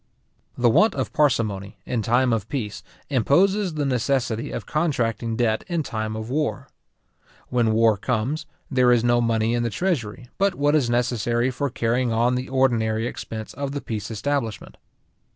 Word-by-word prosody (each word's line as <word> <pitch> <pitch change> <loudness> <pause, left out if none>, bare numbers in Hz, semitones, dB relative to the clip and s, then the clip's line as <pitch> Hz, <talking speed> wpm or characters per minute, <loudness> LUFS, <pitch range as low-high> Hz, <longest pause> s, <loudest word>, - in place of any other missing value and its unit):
The 120 - +3
want 210 - +4
of 130 -5 -3
parsimony, 110 -8 0
in 120 -3 -1
time 120 +3 +2
of 110 -2 -2
peace, 110 -7 -4 0.3
imposes 180 - +2
the 150 -1 -1
necessity 125 -2 0
of - - -5
contracting 120 -8 -1
debt 110 -2 +1
in 170 -3 -1
time 110 -4 -3
of 110 0 -5
war. 150 +4 -2 0.8
When 120 -3 +2
war 110 -1 +4
comes, 130 - -2 0.2
there 125 -2 +4
is 120 -2 +4
no 120 0 +3
money 115 -1 +1
in 120 - +1
the 120 - 0
treasury, 125 - -2
but 195 -1 +2
what 145 +1 +2
is 140 -6 +2
necessary 120 0 +1
for 140 +3 -2
carrying 120 +1 0
on 120 +2 +2
the 125 +1 -3
ordinary 115 -4 +1
expense 110 -2 -6
of 140 +1 -4
the 145 - -3
peace 105 -3 -5
establishment. 115 0 -3
120 Hz, 165 wpm, -23 LUFS, 110-140 Hz, 0.8 s, want